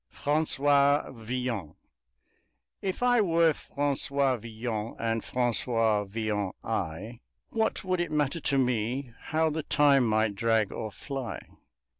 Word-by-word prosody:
FRANCOIS 145 -1 +2
VILLON 115 - -4 1.1
If 195 +4 -2
I 245 -2 +5
were 165 -4 +4
Francois 140 -2 0
Villon 110 -1 -4
and 115 -1 -1
Francois 115 -3 +1
Villon 105 -1 -2
I, 105 +9 -3 0.3
What 220 -1 0
would 185 -1 0
it 170 -3 -2
matter 150 +1 0
to 140 -2 0
me 125 0 0
how 160 0 +1
the 160 +1 -2
time 140 -3 +4
might 110 -1 +2
drag 110 0 +1
or 110 -2 -5
fly? 135 +1 -5
125 Hz, 120 wpm, -28 LUFS, 110-145 Hz, 1.1 s, I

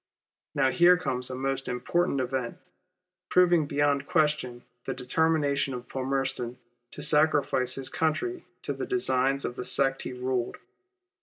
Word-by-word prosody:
Now 135 -2 +3
here 175 +3 +6
comes 125 -8 -2
a 130 - -4
most 135 +1 -2
important 140 +5 0
event, 130 -1 -3 0.7
proving 175 -4 +4
beyond 145 -1 +1
question 150 -6 0 0.2
the 135 - -3
determination 140 0 +1
of 125 0 -8
Palmerston 130 -2 -2 0.4
to - - -4
sacrifice 145 -4 +3
his 135 -1 0
country 165 - -1 0.2
to - - -2
the - - -5
designs 135 - +1
of 120 - -5
the - - -3
sect 135 +1 +1
he - - -5
ruled. 125 -1 -2
135 Hz, 140 wpm, -27 LUFS, 125-155 Hz, 0.7 s, here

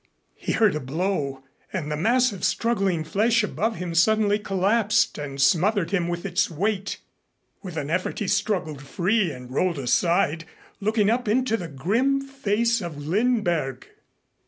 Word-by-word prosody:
He - - -3
heard 215 -3 +3
a 150 - -2
blow, 140 -2 -2 0.3
and 160 -6 -3
the - - 0
mass 245 +9 +2
of 195 -4 -9
struggling 195 -8 +1
flesh 215 +8 +2
above 220 +2 -1
him 180 -3 -5
suddenly 210 +4 +3
collapsed 210 +2 +1
and 140 -2 -6
smothered 170 +6 +2
him 180 -4 +1
with 175 +1 -4
its 180 -3 +1
weight. 195 +4 -2 0.6
With 180 -5 -7
an 145 0 -3
effort 185 +2 -1
he 205 - -2
struggled 190 -8 -1
free 180 +6 0
and 125 -2 -10
rolled 175 +3 +1
aside, 165 +4 +1 0.3
looking 210 0 +2
up 245 0 -1
into 235 +1 +2
the 180 -6 -4
grim 220 - +1
face 235 -4 0
of 170 -5 -6
Lindberg. 170 - 0
195 Hz, 155 wpm, -24 LUFS, 160-220 Hz, 0.6 s, heard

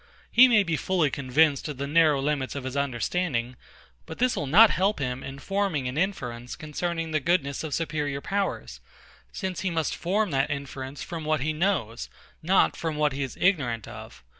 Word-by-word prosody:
He 255 +2 +8
may 220 -4 +4
be 165 -4 -1
fully 170 -5 +1
convinced 140 +2 +2
of 150 -3 -6
the 140 - -3
narrow 150 -1 +4
limits 140 -1 -1
of 140 - -4
his 130 +1 -5
understanding; 130 - -1 0.5
but 160 - -8
this 250 +1 +2
will 145 - -3
not 210 +10 +7
help 195 +3 +1
him 130 -2 -3
in 135 0 -7
forming 190 -4 -1
an 125 - -4
inference 125 -10 -3
concerning 165 +2 -4
the 155 - +1
goodness 140 -3 0
of 155 -3 -2
superior 150 -4 -2
powers, 195 +6 -3 0.5
since 190 -3 -4
he 190 - 0
must 165 -2 -1
form 200 +2 0
that 135 +1 +1
inference 140 -1 -5
from 165 -2 -6
what 155 -1 0
he 155 +3 0
knows, 155 - -1 0.3
not 185 +4 +3
from 160 -2 -3
what 150 -2 +1
he 140 - -4
is 135 -2 -4
ignorant 130 - +1
of. - - -11
150 Hz, 190 wpm, -26 LUFS, 135-180 Hz, 0.5 s, He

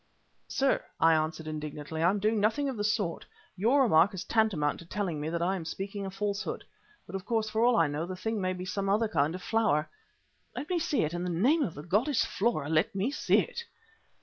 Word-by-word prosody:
"Sir," 275 0 +1 0.2
I 165 0 +6
answered 160 0 -1
indignantly, 155 0 -5
"I 170 - +5
am 200 - +1
doing 215 +2 +1
nothing 225 +8 +1
of 265 - -2
the 205 - -2
sort. 205 -5 -1 0.3
Your 240 +9 +3
remark 190 -3 +4
is 190 - -4
tantamount 190 -12 +1
to 170 - -11
telling 175 -6 -2
me 155 - -2
that 170 +1 -1
I 185 +2 +1
am 180 - -4
speaking 195 +4 -5
a - - -3
falsehood. 200 +1 -3 0.4
But, 175 - -12
of 190 - -4
course, 220 0 -1
for 220 +1 +1
all 245 0 +5
I - - +4
know, 150 +3 -3
the 185 - -5
thing 220 +2 -2
may 185 0 0
be 180 0 -6
some 195 +1 -2
other 215 +3 +2
kind 155 -3 +1
of 185 - -8
flower." 215 -9 +1 0.7
"Let 295 - -5
me 355 - +2
see 310 -3 +1
it. 155 +2 -2
In 175 0 -3
the 180 - -2
name 245 - +3
of 220 - -1
the 145 - -8
goddess 225 - +1
Flora 195 -9 -1
let 160 +6 +1
me 200 +7 0
see - - +3
it!" 470 - -6
195 Hz, 230 wpm, -29 LUFS, 165-220 Hz, 0.7 s, I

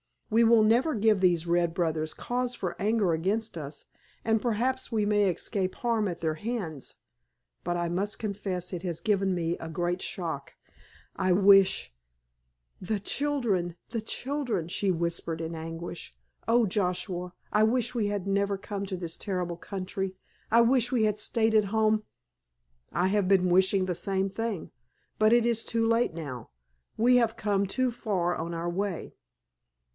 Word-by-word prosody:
"We 230 +2 +5
will 225 -1 +6
never 245 +8 +3
give 215 -1 +3
these 175 -3 +3
red 170 -1 +1
brothers 160 -3 -1
cause 250 0 -2
for 180 -3 -4
anger 210 -3 +2
against 200 +7 -1
us, 150 -2 -5 0.4
and 220 -1 +2
perhaps 250 +4 -1
we 215 -2 +1
may 205 -1 +3
escape 185 +2 -2
harm 230 -3 0
at 175 -3 -5
their 160 -2 0
hands. 180 - -5 0.7
But 175 0 -1
I 175 0 -1
must 195 +4 -1
confess 195 -4 -3
it 175 - -3
has 175 -3 -3
given 195 -3 +1
me 170 -1 -1
a 165 - -6
great 175 +3 -1
shock. 160 -6 -4 0.6
I 185 -1 +2
wish——" 195 - +5 0.9
"The 205 +3 -1
children—the 225 - -1
children——" 245 - -2
she 195 +2 0
whispered 170 -2 -1
in 165 +1 -4
anguish. 165 - -6 0.3
"Oh, 235 0 +4
Joshua, 180 -2 -2 0.2
I 210 - +4
wish 240 +2 +2
we 225 -4 0
had 205 -2 -2
never 200 0 +1
come 200 0 -5
to 190 -1 -4
this 170 -2 -4
terrible 180 -4 -3
country. 190 0 -4 0.3
I 230 +1 +6
wish 245 0 +3
we 235 -3 +3
had 210 -1 +1
stayed 220 +1 +1
at 215 -1 +4
home——" 215 +1 +2 0.9
"I 180 +2 +1
have 200 -1 +1
been 185 -2 +4
wishing 190 +1 +3
the 180 -1 -2
same 195 +2 -1
thing. 225 -3 -4 0.5
But 215 +1 +5
it 240 -1 +4
is 235 -1 +1
too 230 0 0
late 230 -3 +2
now. 130 -8 -6 0.5
We 245 +3 +5
have 230 -2 +1
come 200 -2 +1
too 255 +5 0
far 190 -7 -1
on 170 +1 -4
our 170 +1 -2
way. 190 0 -3
195 Hz, 160 wpm, -28 LUFS, 175-220 Hz, 0.9 s, will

